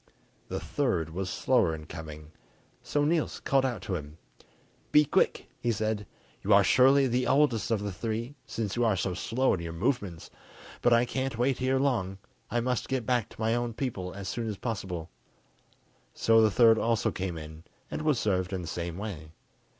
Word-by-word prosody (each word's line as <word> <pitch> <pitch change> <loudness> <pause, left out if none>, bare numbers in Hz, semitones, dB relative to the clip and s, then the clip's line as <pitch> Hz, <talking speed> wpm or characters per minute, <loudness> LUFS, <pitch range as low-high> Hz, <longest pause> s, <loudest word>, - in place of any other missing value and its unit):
The - - -3
third 95 - -1
was 95 +3 -3
slower 80 - +2
in 75 -1 -9
coming, 80 -1 -9 0.5
so 145 0 0
Niels 160 0 0
called 135 -1 +2
out 125 -3 -2
to 100 - -4
him: 75 -2 -5 0.7
"Be 150 0 +6
quick," - - +1
he 120 - 0
said, 110 -2 -2 0.3
"you 105 - -2
are 100 - +6
surely 135 +5 +5
the 125 0 +1
oldest 130 -5 +3
of 110 -3 0
the 100 - -2
three, 115 +6 -3
since 110 -4 -3
you 120 - +1
are 110 -4 +3
so 95 0 -1
slow 125 +8 +1
in 95 - -1
your 85 -1 -5
movements, 95 - -2 0.5
but 120 - +3
I 120 +1 +5
can't 130 -1 -3
wait 125 +2 +1
here 130 +1 +1
long; 115 -9 0 0.3
I 120 - 0
must 125 0 -1
get 130 -3 -1
back 125 -3 +1
to - - -16
my 110 +1 +2
own 120 -1 -1
people 105 -9 -3
as 95 0 -7
soon 115 +4 -3
as 105 - -4
possible." 95 - -4 1.0
So 115 0 +4
the 110 - +5
third 115 +1 +5
also 115 -1 +1
came 90 -3 -4
in, 80 +1 -9 0.3
and - - -3
was 155 -4 +2
served 95 -2 0
in 90 -2 -3
the - - -7
same 85 0 -4
way. 95 -7 -6
110 Hz, 190 wpm, -29 LUFS, 90-125 Hz, 1.0 s, Be